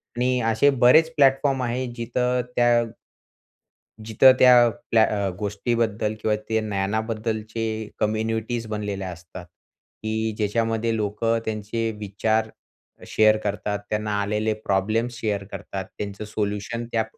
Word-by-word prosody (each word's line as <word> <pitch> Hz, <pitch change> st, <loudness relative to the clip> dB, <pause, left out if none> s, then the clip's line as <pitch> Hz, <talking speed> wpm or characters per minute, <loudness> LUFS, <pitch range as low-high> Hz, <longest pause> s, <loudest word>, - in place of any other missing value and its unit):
आणि 125 Hz, +1 st, +1 dB
असे 115 Hz, +6 st, +4 dB
बरेच 140 Hz, +5 st, +5 dB
प्लॅटफॉर्म 135 Hz, -2 st, +3 dB
आहे 125 Hz, +2 st, -1 dB
जिथं 125 Hz, +1 st, 0 dB
त्या 120 Hz, -1 st, +4 dB, 1.2 s
जिथं 110 Hz, +4 st, +6 dB
त्या 125 Hz, -2 st, +7 dB, 0.2 s
प्ल्या 110 Hz, -1 st, +6 dB
अ, 100 Hz, -3 st, 0 dB
गोष्टीबद्दल 110 Hz, +1 st, -1 dB
किंवा 110 Hz, -1 st, +1 dB
ते 110 Hz, 0 st, +2 dB
ज्ञानाबद्दलचे 110 Hz, +2 st, -2 dB, 0.4 s
कम्युनिटीज 110 Hz, +2 st, -1 dB
बनलेल्या 100 Hz, -3 st, -4 dB
असतात. 90 Hz, +1 st, -11 dB, 0.6 s
की 110 Hz, 0 st, -1 dB
ज्याच्यामध्ये 115 Hz, +1 st, 0 dB
लोकं 110 Hz, +2 st, 0 dB
त्यांचे 110 Hz, +1 st, -2 dB
विचार 110 Hz, +2 st, -1 dB, 0.6 s
शेअर 110 Hz, 0 st, +4 dB
करतात, 105 Hz, 0 st, -2 dB
त्यांना 105 Hz, 0 st, -2 dB
आलेले 105 Hz, +2 st, 0 dB
प्रॉब्लेम्स 110 Hz, +3 st, -1 dB
शेअर 105 Hz, -4 st, -1 dB
करतात, 95 Hz, -1 st, -6 dB
त्यांचं 100 Hz, +1 st, -5 dB
सोल्युशन 105 Hz, +2 st, -3 dB
त्या 110 Hz, -1 st, +1 dB
110 Hz, 115 wpm, -24 LUFS, 105-120 Hz, 1.2 s, त्या